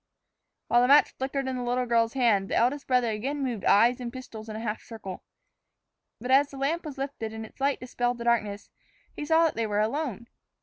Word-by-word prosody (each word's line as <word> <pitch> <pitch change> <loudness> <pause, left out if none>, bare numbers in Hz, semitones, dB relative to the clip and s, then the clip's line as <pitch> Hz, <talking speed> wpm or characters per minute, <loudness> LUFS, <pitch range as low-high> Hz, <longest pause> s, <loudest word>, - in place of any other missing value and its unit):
While 240 - +4
the 250 - +3
match 285 +2 +6
flickered 270 0 -2
in 260 - -2
the - - -3
little 250 +1 0
girl's 230 -1 +2
hand, 225 -7 +2
the - - -1
eldest 275 +4 +1
brother 250 -3 +2
again 270 +7 -3
moved 240 -6 -3
eyes 240 +5 +4
and 240 -1 -4
pistols 230 -4 -9
in 215 - -6
a - - -4
half 220 -1 -3
circle. 205 -5 -8 1.0
But 250 +3 -4
as 275 +2 +5
the 275 - -10
lamp 315 +5 -1
was 290 -3 -7
lifted 265 -5 -4
and 220 0 -6
its 220 - -16
light 280 +1 +1
dispelled 245 -1 -2
the 235 - -6
darkness, 215 -4 0 0.4
he 295 - -5
saw 320 +2 +4
that 325 - +2
they 230 -1 -2
were 205 0 0
alone. 235 0 -2
245 Hz, 220 wpm, -27 LUFS, 225-275 Hz, 1.0 s, match